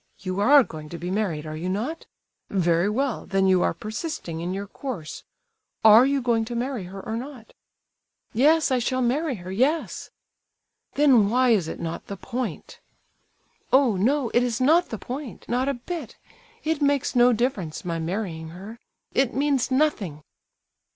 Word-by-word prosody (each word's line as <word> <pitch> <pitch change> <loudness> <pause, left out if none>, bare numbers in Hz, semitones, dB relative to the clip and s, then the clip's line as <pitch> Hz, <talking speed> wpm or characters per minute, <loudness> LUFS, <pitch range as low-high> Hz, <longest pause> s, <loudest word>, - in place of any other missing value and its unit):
You 185 0 -4
are 275 +6 +7
going 155 -6 -9
to 170 - -6
be 175 +2 -5
married, 185 -7 -1
are 155 0 -5
you 170 +4 -4
not? 235 - -3 0.4
Very 175 0 +2
well, 260 +3 -2
then 195 -1 +1
you 185 -1 +4
are - - +2
persisting 215 - -5
in 175 +2 -3
your 195 +2 -3
course. 200 - -7 0.6
Are 220 +4 +8
you 275 -2 0
going 235 -2 +2
to 240 +1 -6
marry 245 -4 -3
her 190 +2 -8
or 220 - -3
not?" 245 -1 -8 0.8
"Yes, 300 +5 +4
I 255 - +3
shall 255 +2 0
marry 275 +4 0
her—yes." 225 - -1 0.9
"Then 255 -8 +5
why 250 +2 +3
is 195 -8 +2
it - - -6
'not 165 0 -5
the 200 - -6
point'?" 250 +4 -5 0.9
"Oh, 260 -5 +4
no, 245 +6 +1
it 240 - +4
is 245 -1 -1
not 320 +7 +4
the 225 - -4
point, 255 +3 -7
not 255 +3 0
a 280 - -1
bit. 290 +2 -7 0.5
It 315 -1 -1
makes 285 -2 +1
no 245 0 +6
difference, 215 - -2
my 165 -1 -2
marrying 165 -2 -4
her—it 225 +7 -4
means 280 -2 +1
nothing." 240 - 0
230 Hz, 165 wpm, -25 LUFS, 185-270 Hz, 0.9 s, Are